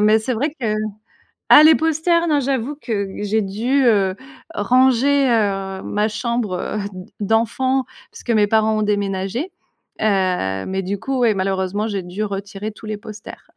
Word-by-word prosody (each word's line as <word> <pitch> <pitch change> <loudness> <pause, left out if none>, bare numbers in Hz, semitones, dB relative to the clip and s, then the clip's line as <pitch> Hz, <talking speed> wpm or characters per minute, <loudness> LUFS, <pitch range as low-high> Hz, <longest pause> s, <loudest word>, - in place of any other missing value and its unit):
mais 215 +1 +5
c'est 235 +3 -2
vrai 280 +8 -1
que 215 -3 0 0.7
ah 300 - +9
les 315 0 +8
poster 325 +2 +2
non 300 -2 +3
j'avoue 275 0 -2
que 205 -7 -2 0.2
j'ai 215 +2 +1
dû, 230 +8 0
heu, 195 -4 +3 0.4
ranger, 260 +5 +3
heu, 195 -4 0
ma 210 +1 -1
chambre, 220 -2 -2
heu, 215 - -3
d 185 -1 -10
d'enfant 230 +5 +1 0.3
parce - - -12
que 235 - -1
mes 210 -2 +4
parents 220 0 +2
ont 215 - 0
déménagé. 205 - -1 0.5
Heu, 185 - 0
mais 190 0 -2
du 195 +1 -4
coup 270 -1 -2
ouais 235 -4 +3
malheureusement 195 +2 -1
j'ai 200 -3 -3
dû 180 +4 -5
retirer 200 +1 -4
tous 215 +1 -13
les 215 -1 -3
posters. 215 0 -11
215 Hz, 170 wpm, -20 LUFS, 195-250 Hz, 0.7 s, ah